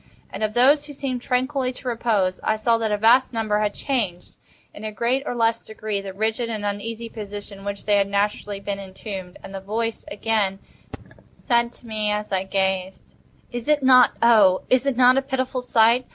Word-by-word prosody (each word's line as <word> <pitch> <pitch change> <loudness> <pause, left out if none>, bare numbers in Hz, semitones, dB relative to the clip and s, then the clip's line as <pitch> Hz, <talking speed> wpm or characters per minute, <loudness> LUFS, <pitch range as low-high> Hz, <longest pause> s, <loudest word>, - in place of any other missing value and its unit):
And - - -7
of 215 0 -1
those 285 +4 +4
who 290 - -9
seemed 265 -3 -3
tranquilly 255 +1 0
to 255 - -10
repose, 220 -6 0
I 220 - +1
saw 230 +1 +1
that 220 -1 -1
a 210 - +1
vast 240 +5 +4
number 215 -2 0
had 210 -1 -1
changed, 210 -11 -3 0.4
in 205 - -11
a 215 - -4
greater 245 +7 -1
or - - -3
less 230 -1 +1
degree, 215 -2 -4
the 195 -1 -7
rigid 220 +4 -1
and 215 -2 -4
uneasy 220 +3 -4
position 205 -2 -8
in 195 - -12
which 200 0 -5
they 205 -1 +3
had 200 -1 +2
originally 205 0 -1
been 200 0 -4
entombed. 190 -1 -8
And 195 - -10
the 195 - -4
voice 225 +3 -3
again 210 -3 0 0.8
said 235 -1 +1
to - - -15
me 215 -2 -1
as 210 0 -3
I 190 0 0
gazed: 190 -1 -2 0.4
"Is 240 0 -5
it 300 -2 +2
not—oh! 235 -6 +5
is 255 +1 +3
it 270 -3 0
not 255 +1 +6
a - - +3
pitiful 260 -1 -2
sight?" 235 0 +3
220 Hz, 195 wpm, -23 LUFS, 200-245 Hz, 0.8 s, not